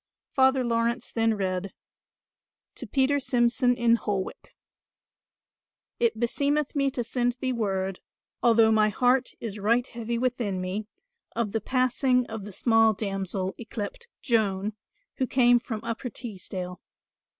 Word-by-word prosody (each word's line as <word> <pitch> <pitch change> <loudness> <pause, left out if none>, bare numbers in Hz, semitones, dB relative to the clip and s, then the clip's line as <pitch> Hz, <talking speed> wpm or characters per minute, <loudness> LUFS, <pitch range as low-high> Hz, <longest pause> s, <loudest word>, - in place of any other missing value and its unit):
Father 265 -1 +4
Laurence 235 0 0
then 225 -1 +2
read 190 -1 -2 1.0
"To - - -8
Peter 280 +1 +2
Simson 245 -1 +2
in 235 -1 +3
Holwick 200 -4 -4 1.4
"It 230 -2 +1
beseemeth 285 +5 0
me 275 -1 +2
to 250 -2 -3
send 245 +1 0
thee 255 +1 -2
word, 195 -4 -1 0.4
although 225 -2 +5
my 215 -1 +4
heart 250 +4 +2
is 215 -2 -5
right 230 +4 +2
heavy 235 -2 -4
within 235 -6 -1
me, 190 +4 -3 0.5
of 225 -3 -1
the 225 - -1
passing 255 +1 +2
of 220 -3 -7
the 210 - -8
small 225 +2 +4
damsel 195 -2 -2
y 235 - -7
cleped 240 - -5 0.2
Joan, 210 -4 +1 0.4
who 260 - 0
came 245 -1 +5
from 225 -3 -5
Upper 230 +2 -4
Teesdale. 185 -5 -6
230 Hz, 135 wpm, -27 LUFS, 205-250 Hz, 1.4 s, although